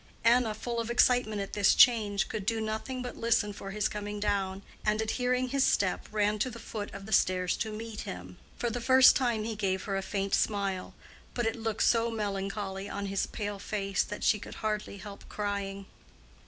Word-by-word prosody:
Anna, 230 -1 +4
full 235 +2 -3
of 230 0 -3
excitement 235 -3 +3
at 195 - -6
this 205 -2 +4
change, 210 -5 +5
could 210 - -4
do 225 +2 0
nothing 220 +4 -3
but 245 - -6
listen 230 -3 +1
for 195 0 -8
his 210 +1 0
coming 205 0 -5
down, 200 -2 -1 0.2
and 210 0 +1
at 220 0 -1
last - - -1
hearing 250 0 +1
his 275 +1 +2
step, 190 -7 +1
ran 210 0 +1
to 255 - +1
the 235 - -9
foot 215 -2 -6
of 195 0 -8
the 220 - -9
stairs 185 -1 +3
to 220 - -2
meet 220 0 -6
him. 90 0 -7 0.2
For 240 - -1
the 245 +2 -3
first 260 +2 +7
time 240 -5 +1
he 220 0 -3
gave 190 -2 -1
her 195 - -2
a - - -1
faint 195 0 -2
smile, 200 -3 0 0.4
but 240 - 0
it 225 - 0
looked 225 -2 -1
so 230 0 +3
melancholy 195 -2 -3
on 200 0 -4
his 195 - 0
pale 205 -2 -4
face 195 -1 -1
that 205 - -5
she 210 - +3
could - - -9
hardly 210 -1 -2
help 200 +1 -10
crying. 200 -1 -3
210 Hz, 210 wpm, -30 LUFS, 200-230 Hz, 0.4 s, first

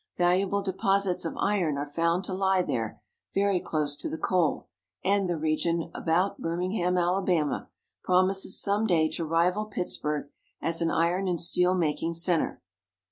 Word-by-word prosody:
Valuable 185 +3 +2
deposits 195 -1 0
of - - -4
iron 180 -8 +1
are 145 - -2
found 170 +5 0
to 190 - -3
lie 190 -1 +2
there 115 -9 -3 0.4
very 200 -2 +2
close 150 -4 -1
to - - -4
the - - -4
coal, 175 -4 0 0.4
and 195 -1 +2
the 175 - 0
region 165 +2 0
about 175 +4 0
Birmingham, 180 +2 -1
Alabama, 175 -3 0 0.3
promises 185 +1 +2
some 205 +2 +1
day 165 -5 +3
to 170 - -4
rival 170 +6 +1
Pittsburg 150 -8 -2 0.3
as 165 0 0
an 165 - +2
iron 175 +4 +1
and 175 -2 0
steel 180 +1 +2
making 165 -1 -1
center. 170 - 0
180 Hz, 150 wpm, -27 LUFS, 165-190 Hz, 0.4 s, day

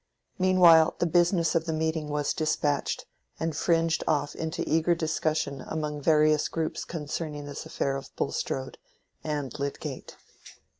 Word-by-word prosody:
Meanwhile 175 -3 +6
the - - +1
business 175 0 +3
of 165 -1 +1
the 165 - -2
meeting 160 -1 -1
was 150 -1 0
despatched, 150 -2 -1 0.3
and 160 -1 -2
fringed 165 0 +1
off 145 -2 +1
into 160 0 -3
eager 165 +2 +2
discussion 155 -3 -1
among 150 -2 -3
various 155 0 +4
groups 160 -1 -3
concerning 150 -2 -5
this 145 -1 -7
affair 135 0 -1
of 135 - -6
Bulstrode—and 140 +1 -5
Lydgate. 140 0 -5
155 Hz, 130 wpm, -27 LUFS, 145-165 Hz, 0.3 s, Meanwhile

